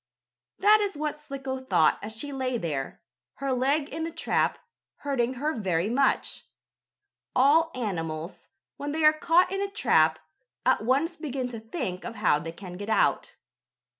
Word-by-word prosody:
That 420 +2 +6
is 395 -6 -1
what 300 0 -3
Slicko 270 -3 -5
thought 260 -12 +3
as 220 +1 -6
she 285 +6 -5
lay 255 -2 -1
there, 150 -9 -4 0.3
her 275 -1 -2
leg 280 +4 +1
in 320 +2 -4
the 330 - -2
trap, 330 - 0 0.4
hurting 260 -3 -1
her 300 +5 -1
very 190 - -1
much. 275 +2 +1 0.9
All 295 +6 +5
animals, 165 -7 -4 0.3
when 290 +1 -4
they 320 0 -1
are 305 - +8
caught 340 +4 +3
in 390 0 -1
a 400 - -1
trap, 160 - +3 0.5
at - - +3
once 280 +8 +1
begin 270 -4 -3
to 230 -2 -7
think 220 - -5
of - - -6
how 185 -8 +2
they 165 +2 -6
can 180 +1 -9
get 205 +2 -6
out. - - +1
260 Hz, 165 wpm, -27 LUFS, 205-305 Hz, 0.9 s, are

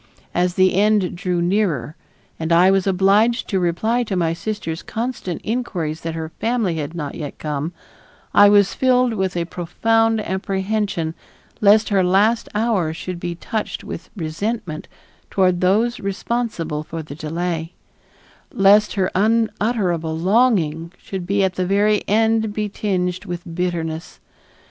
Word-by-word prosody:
As 180 0 +1
the 185 0 +4
end 205 -1 +2
drew 175 -1 -1
nearer 170 - 0 0.4
and 160 +1 -2
I 175 +3 +6
was 195 0 +1
obliged 200 +5 +3
to 190 - +1
reply 200 +8 +1
to 200 - -3
my 165 -2 +1
sister's 170 -3 -4
constant 225 -7 -4
inquiries 185 -9 -3
that 165 -1 -4
her 160 -1 -4
family 225 -8 0
had 150 +2 -4
not 150 -4 -4
yet 145 -3 -6
come, 150 +1 -3 0.6
I 205 0 +7
was 205 -1 +4
filled 255 -2 +2
with 190 -4 -1
a 170 - 0
profound 225 +7 +1
apprehension 190 -3 -2 0.5
lest 210 +1 +5
her 195 -3 +3
last 205 +6 +2
hours 200 -8 0
should 180 -1 -5
be 175 0 -4
touched 215 +5 -4
with - - -7
resentment 170 +1 -3 0.4
toward 185 -2 +2
those 215 +6 +2
responsible 195 -6 -2
for 160 +1 -6
the 150 - -9
delay; 165 +2 -3 0.8
lest 205 +2 +4
her 190 -2 0
unutterable 210 -6 +1
longing 175 -5 +2
should 185 -2 -7
at 195 -2 +2
the 185 0 -1
very 205 +2 +3
end 220 0 +2
be 210 -1 -1
tinged 185 -2 -2
with 175 -2 -5
bitterness. 165 -2 -3
190 Hz, 140 wpm, -20 LUFS, 170-215 Hz, 0.8 s, I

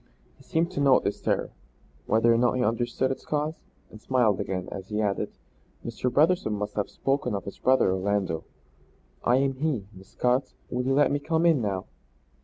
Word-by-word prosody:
He - - -22
seemed 165 +2 -1
to 185 - -4
note 140 -2 +5
this 100 - -2
terror, - - 0 0.6
whether 115 +2 +4
or - - +3
not 120 0 +3
he 125 -1 0
understood 120 +3 0
its 135 - -5
cause, 150 +1 -1 0.4
and 110 - -12
smiled 120 -6 +2
again, 90 -1 -3
as 95 -1 -7
he 105 0 -2
added: 100 -2 0 0.6
"Mr. 125 - -2
Brotherson 155 -3 +3
must 105 0 -3
have 105 - -1
spoken 135 -5 -1
of 100 - -5
his 100 - -8
brother 130 -7 +3
Orlando. 95 -3 -1 0.8
I 120 - +4
am 135 +1 +2
he, 140 -8 -1
Miss 95 0 -14
Scott. 125 +2 0 0.2
Will 125 - 0
you 135 +1 +1
let 145 -1 +4
me 145 - +1
come 160 +3 0
in 160 -6 +4
now?" 95 -3 -2
125 Hz, 195 wpm, -27 LUFS, 105-140 Hz, 0.8 s, note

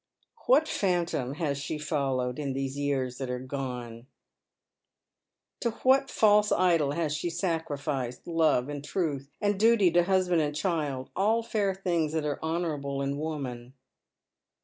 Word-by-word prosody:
What 400 -11 +5
phantom 175 - 0
has 145 -3 -1
she 145 +2 -3
followed 135 -4 -1
in 140 -3 -2
these 135 0 -3
years 135 -3 -1
that 135 -2 -3
are 125 - -2
gone? 125 -3 -6 1.5
To 235 - 0
what 270 +1 +4
false 210 -1 +4
idol 165 -6 +3
has 155 -2 -1
she 155 +3 -2
sacrificed 150 -7 -3
love 160 -6 +2
and 145 -1 -5
truth, 145 -5 -2
and 205 -2 0
duty 220 -5 +5
to 175 0 +4
husband 180 -3 +2
and 150 -1 -1
child, 150 -6 -2
all 220 +4 +2
fair 205 -4 0
things 170 -5 -1
that 160 -2 -1
are 145 -1 -2
honourable 150 -4 -2
in 140 +1 -2
woman 135 -5 -5
150 Hz, 145 wpm, -28 LUFS, 135-180 Hz, 1.5 s, What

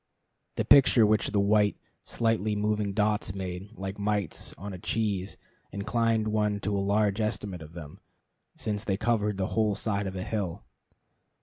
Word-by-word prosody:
The - - -1
picture 125 -4 +7
which 105 +1 +2
the 105 - +1
white, 105 +1 +3 0.3
slightly 110 -2 0
moving 105 -1 0
dots 105 -1 0
made, 95 0 -5
like 95 -1 -6
mites 100 -4 -2
on 100 +1 -7
a 90 - -7
cheese, 100 -2 -1 0.3
inclined 115 +1 0
one 105 -1 +1
to 100 +1 -1
a 100 - +1
large 100 +1 +1
estimate 105 -4 -3
of 80 +1 -11
them, 75 -4 -9 0.6
since 105 -1 -2
they 95 -3 -1
covered 105 -2 0
the 95 -1 -1
whole 110 -2 +2
side 100 -2 -1
of 95 - -5
a 90 - -3
hill. 100 -4 -3
105 Hz, 165 wpm, -28 LUFS, 95-110 Hz, 0.6 s, picture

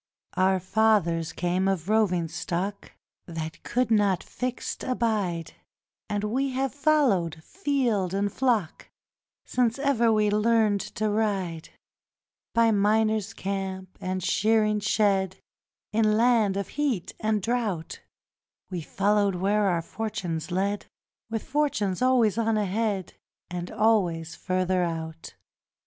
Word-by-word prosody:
Our 190 0 +3
fathers 185 -5 +2
came 180 +2 0
of 190 -3 -1
roving 200 -6 +2
stock 185 +5 -4 0.3
That 165 -1 -6
could 250 -2 -1
not 205 -4 +3
fixed 250 0 -4
abide: 210 -10 -1 0.6
And 205 -1 -1
we 260 +6 0
have 265 0 -1
followed 245 - +2
field 255 - 0
and 200 +1 -1
flock 230 -10 0 0.6
Since 245 -1 +1
e'er 270 -5 +2
we 210 -1 +2
learnt 215 -1 +3
to 215 - 0
ride; 195 -7 -1 0.9
By 230 -1 +5
miner's 215 +1 +2
camp 190 -1 -4
and 185 0 -3
shearing 215 +2 +2
shed, 195 -3 +1 0.6
In 215 -1 +3
land 225 -4 +3
of 200 - -3
heat 270 - -1
and 215 0 +1
drought, 210 -6 -2 0.7
We 180 -2 -3
followed 200 +4 +1
where 200 +3 +1
our 170 -3 +1
fortunes 175 -7 -4
led, 200 +3 -1 0.4
With 225 -1 -3
fortune 270 -9 0
always 245 -4 +3
on 225 -1 +1
ahead 205 -1 -1 0.4
And 175 0 -4
always 175 -7 +1
further 185 0 0
out. 165 -1 -5
205 Hz, 120 wpm, -26 LUFS, 185-225 Hz, 0.9 s, By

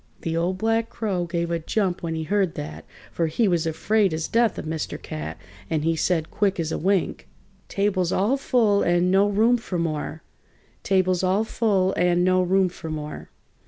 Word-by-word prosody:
The 165 0 -2
Old 175 +3 0
Black 225 +2 0
Crow 190 -6 -2
gave 170 0 -2
a 170 - 0
jump 185 +2 -1
when 165 -1 -3
he 160 - -3
heard 190 +1 0
that, 75 +1 -7 0.3
for 165 - 0
he 205 +8 +1
was 170 -3 +1
afraid 195 +2 +1
as 160 0 -3
death 230 -1 +2
of - - -5
Mr. 160 0 -4
Cat, 75 +1 -6 0.3
and 155 -2 0
he 165 +1 +1
said, 160 0 0
quick 200 -3 0
as 160 -1 -1
a - - -1
wink: 190 +1 0 0.4
"Table's 190 -3 0
all 210 +8 +2
full 230 -7 +2
and 175 +1 +2
no 195 +2 +4
room 225 +4 +3
for 215 -6 -4
more! 160 -1 -3 0.6
Table's 185 -2 +2
all 190 +3 +2
full 200 -4 +1
and 175 0 +2
no 185 0 +3
room 190 +1 +3
for 170 -2 -8
more!" 150 -1 -6
180 Hz, 190 wpm, -24 LUFS, 165-200 Hz, 0.6 s, no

